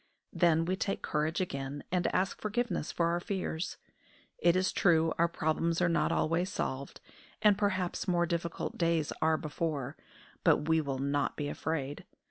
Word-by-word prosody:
Then 165 -2 +3
we 185 +2 0
take 195 +1 -2
courage 155 +2 0
again, 140 -4 -4
and 180 -1 +1
ask 190 +1 0
forgiveness 215 -5 -1
for 170 -1 +1
our 170 +1 +1
fears. 180 -3 -3 0.6
It 170 0 +4
is 185 0 +2
true 165 -3 +3
our 170 - +5
problems 165 0 0
are 175 - +3
not 170 - +2
always 170 +4 +1
solved, 135 -6 -4 0.4
and 210 -1 +7
perhaps 190 -3 -1
more 175 -1 +3
difficult 170 -1 -3
days 165 -3 +1
are 160 0 +3
before; 150 -3 -3 0.5
but 150 - +3
we 160 0 +4
will 140 -3 -3
not 140 +2 0
be 145 -1 -2
afraid. 145 -3 -3
165 Hz, 160 wpm, -31 LUFS, 150-180 Hz, 0.6 s, and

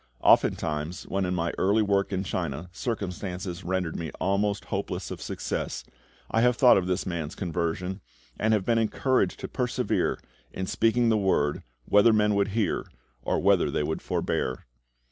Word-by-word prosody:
Oftentimes, 75 +2 +2
when 95 -1 -1
in 90 0 -1
my 85 -1 -1
early 105 +3 +3
work 100 -1 +1
in 95 -1 -1
China 85 -3 -3
circumstances 95 -4 -4
rendered 90 -2 -1
me 80 -2 -4
almost 100 +2 0
hopeless - - -4
of - - -6
success, - - -3 0.5
I 115 - +2
have 125 0 +4
thought 125 0 +7
of 90 -2 +1
this 90 0 -1
man's 85 -4 -4
conversion, 90 +1 -2 0.4
and 110 - +2
have 100 -3 -1
been 115 -1 +3
encouraged 125 +4 +1
to - - -4
persevere - - 0 0.3
in 95 - -4
speaking 115 +4 +2
the 110 - +3
Word, 85 -8 +1 0.2
whether 105 +3 +5
men 105 -1 +3
would 100 0 +2
hear 105 +1 -1 0.3
or - - 0
whether - - +3
they - - 0
would 80 - -2
forbear. 65 0 -2
95 Hz, 165 wpm, -27 LUFS, 85-105 Hz, 0.5 s, thought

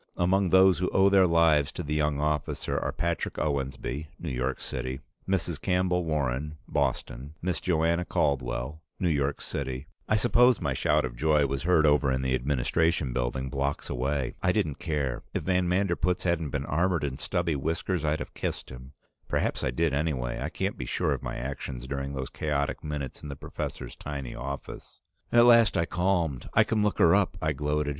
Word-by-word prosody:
Among 95 +2 +2
those 95 0 +6
who 90 - 0
owe 95 +1 +4
their 95 -2 +5
lives 80 -4 +4
to 90 - -4
the 75 0 -3
young 75 -1 +1
officer 75 -1 -1
are: - - -1
Patrick 85 -1 -2
Owensby, 70 0 -2
New 85 - -5
York 65 +1 -2
City; 65 +1 -4 0.3
Mrs. 85 -5 -1
Campbell 90 -1 +1
Warren, 75 -1 -1
Boston; 70 +1 -2
Miss 90 0 -2
Joanna 85 -1 +1
Caldwell, 65 0 -1 0.2
New 90 - +1
York 70 -1 0
City 65 0 -4
" - - -30
I 110 - +4
suppose 120 +2 +4
my - - -1
shout 75 -2 +2
of - - -6
joy 75 +2 +3
was 70 0 -2
heard 80 -1 +4
over 75 -2 +4
in 65 0 0
the 65 -1 0
Administration 70 +3 +1
Building, 65 +1 -1
blocks 70 +2 -2
away. 65 +1 -1
I - - +3
didn't 70 -3 -1
care; 70 -6 -2
if - - -1
van 90 -1 +1
Manderpootz 90 -1 +1
hadn't 85 -4 0
been 70 -1 -3
armored 85 +3 +1
in 65 -2 -3
stubby 85 -3 -1
whiskers, 80 +4 -1
I'd 75 0 +1
have - - -7
kissed - - -4
him. 65 +2 -11 0.3
Perhaps - - -1
I - - +1
did 75 +5 0
anyway; 70 -5 -1
I - - -2
can't - - -3
be - - -3
sure - - +1
of - - -4
my - - -4
actions 65 -1 -5
during 70 +1 -4
those 65 -1 -4
chaotic 75 -1 -2
minutes 75 -4 -5
in 75 - -7
the 70 - -5
professor's - - -6
tiny 70 -4 -6
office. 70 +1 -7 0.3
At 120 0 +7
last 115 -4 +6
I 85 - +2
calmed. 85 -6 0
"I - - +7
can 110 -2 0
look 105 -1 +1
her 85 - +6
up!" 100 -2 +2
I 75 -2 0
gloated. 75 +1 -1
75 Hz, 190 wpm, -28 LUFS, 70-85 Hz, 0.3 s, At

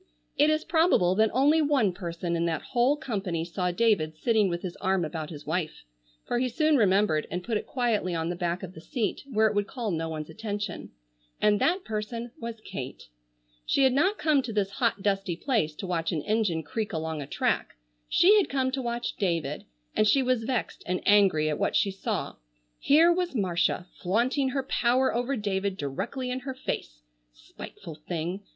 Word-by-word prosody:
It 300 - +4
is 310 0 +1
probable 320 - +3
that 220 +3 +3
only 290 +6 +4
one 275 -10 +2
person 170 -1 -3
in 170 0 0
that 160 -2 -2
whole 255 +4 +3
company 195 - -3
saw 180 +1 -2
David 175 -6 +1
sitting 220 0 +2
with 175 0 -3
his 180 -2 -5
arm 190 -2 +1
about 155 0 -5
his 150 -3 -9
wife—for - - -4
he 255 0 +1
soon 310 +5 +2
remembered 195 - +3
and 180 0 -4
put 230 +2 -2
it 210 - -2
quietly 225 -8 0
on 165 0 -1
the 175 - -2
back 175 +1 -2
of 185 -1 -7
the 160 - -11
seat, 225 +5 -2
where 220 -1 +3
it 215 - +2
would 205 -1 0
call 235 -3 -3
no 165 -1 -2
one's 155 -1 -5
attention—and 180 - -3
that 360 +3 +2
person 225 +2 -4
was 230 -1 -6
Kate. 135 - -7 0.5
She 275 - +2
had 260 -1 +5
not 375 +10 +2
come 305 -3 +3
to 245 - -5
this 205 -2 0
hot 230 -4 0
dusty 195 -3 0
place 195 - 0
to 195 - -6
watch 165 -3 -1
an 155 -4 -2
engine 205 -7 0
creak 220 +7 -3
along 160 -1 -3
a 140 - -6
track, - - -1 0.3
she 395 +4 +6
had 405 - +2
come 260 -1 0
to 265 0 -2
watch 240 0 -3
David, 165 -7 -1 0.3
and 215 - +3
she 270 +4 +4
was 250 -3 +1
vexed 250 -2 -2
and 180 0 0
angry 195 -7 +4
at 150 - -1
what - - 0
she 200 - +3
saw. 190 - -3 0.4
Here 325 +4 +5
was 355 -4 -2
Marcia 175 -4 +1 0.2
flaunting 245 +8 +1
her 270 +1 -1
power 255 0 +2
over 245 +3 0
David 200 -3 -2
directly 250 - -3
in 255 - -2
her 260 0 -6
face. - - -5 0.3
Spiteful 160 - -10
thing! 175 +3 -3
205 Hz, 190 wpm, -27 LUFS, 170-250 Hz, 0.5 s, she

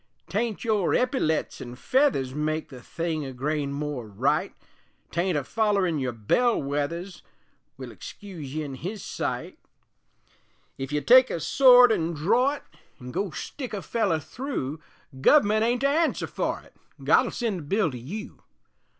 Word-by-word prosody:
'Tain't 215 +4 -2
your 215 -6 +1
eppyletts 250 - 0
an' 120 0 -7
feathers 255 - +1
Make 155 +2 -2
the 130 -3 -11
thing 165 +2 -3
a 135 - -5
grain 140 +2 -2
more 140 -4 -4
right; 130 +9 0 0.6
'Tain't 175 -1 0
a 145 - -1
follerin' 200 - +1
your 130 -2 -1
bell 170 - +1
wethers 150 +7 -3 0.6
Will - - -8
excuse 165 -9 -9
ye 155 - -1
in 140 -2 -6
His 185 +9 -6
sight; - - -4 1.2
Ef 135 +1 -4
you 150 0 0
take 255 - +7
a - - -2
sword 250 - +7
an' 170 -5 0
dror 235 - +2
it, - - -12 0.4
An' 125 0 -8
go 200 +8 -2
stick 245 - -6
a 195 - -5
feller 205 -8 0
thru, 155 - -5 0.4
Guv'ment 215 - +4
ain't 240 +2 +1
to 275 - +3
answer 320 +3 +1
for - - -3
it, - - -21 0.3
God'll - - +4
send 225 -7 -2
the - - -8
bill 195 0 +1
to 125 - -7
you. 205 - -8
170 Hz, 160 wpm, -26 LUFS, 145-225 Hz, 1.2 s, take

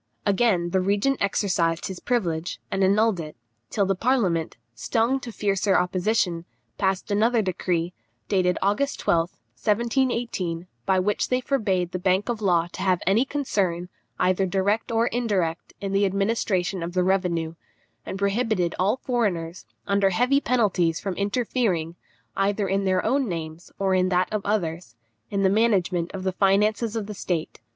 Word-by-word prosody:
Again 195 -4 +2
the 190 - +2
regent 205 +8 +1
exercised 180 -4 +1
his 190 -3 -5
privilege, 175 -9 -1
and 195 - +1
annulled 205 0 +3
it, 155 -4 -7 0.3
till 200 - +1
the 195 - +2
parliament, 190 - 0 0.2
stung 230 - 0
to 245 -2 -7
fiercer 200 -2 +1
opposition, 180 -1 0 0.3
passed 195 +1 0
another 225 +2 +3
decree, 180 -2 -1 0.3
dated 180 -2 +2
August 210 +9 0
12th, 170 +1 0 0.3
1718, 230 -6 0 0.2
by 190 - +3
which 200 +3 0
they 250 - +2
forbade 200 -10 0
the 185 - -3
bank 190 +3 +1
of 230 -2 -2
Law 175 -4 +3
to - - -7
have 185 -2 +2
any 205 +8 +3
concern, 190 -12 -1 0.3
either 185 +1 +2
direct 200 +5 0
or 230 0 +2
indirect, 205 -9 -1
in 195 -1 -4
the 200 0 +3
administration 195 -2 0
of 170 +1 -4
the 180 0 +2
revenue; 180 -4 0 0.5
and 190 - -5
prohibited 200 -3 0
all 200 +7 +2
foreigners, 195 -10 -2 0.2
under 200 -1 +2
heavy 250 +9 +2
penalties, 190 - +1
from 195 - -3
interfering, 200 -5 -1 0.4
either 200 +1 +1
in 195 +1 0
their 185 -1 +1
own 270 -4 +1
names, 165 0 -6
or 195 -1 +1
in 185 0 +2
that 180 +2 +1
of 210 -2 -1
others, 170 - -2 0.3
in 200 -1 0
the - - +5
management 190 -5 +2
of 190 -1 -6
the 190 - 0
finances 210 +4 +2
of 220 -2 -2
the 210 - -6
state. 175 -5 -3
195 Hz, 160 wpm, -25 LUFS, 180-215 Hz, 0.5 s, the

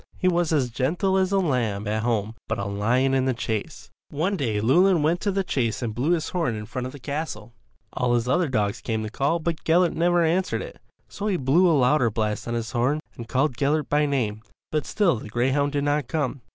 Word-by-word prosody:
He 185 - 0
was 175 -2 +2
as 135 -6 +1
gentle 170 - 0
as 190 0 +2
a 200 - +3
lamb 120 - 0
at 110 +1 0
home 110 -2 -1
but - - -2
a 100 - -3
lion 115 +7 +1
in 130 -1 +2
the 130 -2 0
chase. 110 -3 -4 0.2
One 165 +8 -1
day 115 - -1
Llewelyn 170 - +4
went 165 +3 +1
to 205 - 0
the 195 0 0
chase 125 - -1
and 115 -2 -2
blew 135 +10 +1
his 160 -2 -1
horn 165 -10 -1
in 105 0 -6
front 125 +3 -4
of 130 - -9
his 145 - -12
castle. 140 -6 -5 0.4
All 125 -2 +1
his 120 0 0
other 175 +6 +2
dogs 105 -5 -1
came 110 -2 -2
to 110 - -4
the - - -21
call 140 +7 +1
but 165 -1 -3
Gellert 175 +1 +3
never 175 +2 +2
answered 175 +3 0
it. - - -10 0.3
So 205 - -5
he 195 -4 +1
blew 170 +6 +3
a 160 - +4
louder 125 -1 +3
blast 105 0 -2
on 120 - -2
his 115 -1 -3
horn 125 +6 +1 0.2
and 115 - -8
called 130 -1 +1
Gellert 150 +2 0
by 150 0 +2
name, 110 -7 -1 0.3
but 155 -1 -1
still 185 - +2
the 110 - -9
greyhound 135 +5 +1
did 145 -1 0
not 145 -2 0
come. 145 -4 -2
140 Hz, 235 wpm, -24 LUFS, 115-165 Hz, 0.4 s, Llewelyn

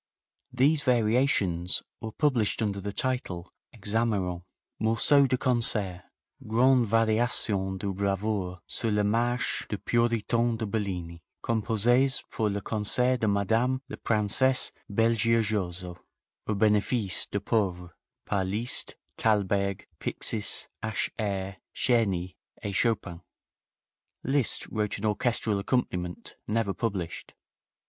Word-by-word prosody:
These 140 +5 +3
variations 110 -8 +2 0.2
were 110 -1 -5
published 120 -5 +1
under 100 -2 -2
the 100 +1 -4
title: 100 -8 -2 0.2
"Hexameron: 100 -5 -1 0.4
Morceau 135 +6 +4
de 130 0 +1
Concert. 115 -8 +3 0.5
Grandes 120 +1 +3
Variations 110 -3 +2
de 100 - -7
bravoure 95 -2 -2
sur 115 - -1
la 105 -1 +1
marche 120 +4 0
des 105 - -2
Puritans 115 +1 +1
de 110 - -3
Bellini, 90 -6 -4 0.2
composees 120 +4 +2
pour 110 -1 0
le 100 0 -3
concert 125 +5 +1
de 110 - 0
Madame 110 +6 +1
la - - -7
Princesse 115 +4 +2 0.2
Belgiojoso 105 -5 0 0.5
au 110 - 0
benefice 105 -1 +1
des - - -2
pauvres, 95 -5 -1 0.3
par 100 -2 0
MM. 95 - -4
Liszt, 115 +5 -1 0.2
Thalberg, 100 -2 +1
Pixis, 105 -3 0
H. 110 0 -2
Herz, 100 -2 -3 0.2
Czerny 95 -7 +1 0.3
et 100 - -3
Chopin." 95 -5 -1 1.0
Liszt 135 -2 +1
wrote 105 -1 -1
an 105 - -5
orchestral 110 -1 0
accompaniment, 90 -6 -3
never 105 -2 0
published. 95 -8 -4
110 Hz, 110 wpm, -27 LUFS, 100-120 Hz, 1.0 s, Morceau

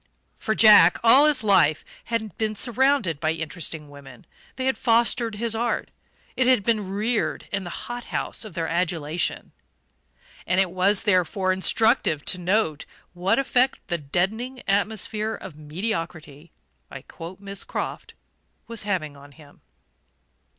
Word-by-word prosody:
For 220 - -1
Jack, 210 -6 +7
all 260 +6 +7
his 295 -5 +3
life, 180 -7 +3 0.2
had 225 -2 -3
been 215 -1 -1
surrounded 245 - +1
by 155 0 0
interesting 160 -1 -4
women: 140 -4 -14 0.3
they 260 - -3
had 265 - +1
fostered 230 -1 +2
his 230 +1 -1
art, 235 +1 -2 0.4
it 255 - +1
had 255 -6 +4
been 210 -3 0
reared 215 +4 -1
in 195 -1 -3
the - - -5 0.2
hot 240 0 -6
house - - -3
of 215 -6 -10
their 165 -2 -2
adulation. 170 -1 -2 1.0
And 185 +2 +2
it 190 -2 +2
was 190 +2 +2
therefore 185 -1 +1
instructive 190 - +2
to 185 - 0
note 180 -4 0 0.3
what 180 +2 +1
effect 265 -1 +2
the 170 -1 -1
"deadening 210 - -2
atmosphere 215 +2 -1
of 155 -5 -11
mediocrity" 160 -2 -5 0.4
(I 135 -1 -9
quote 170 +5 -10
Miss 200 0 -6
Croft) - - -5 0.5
was 230 -1 -4
having 175 -8 -3
on 140 0 -15
him. 145 -2 -18
195 Hz, 145 wpm, -24 LUFS, 165-225 Hz, 1.0 s, Jack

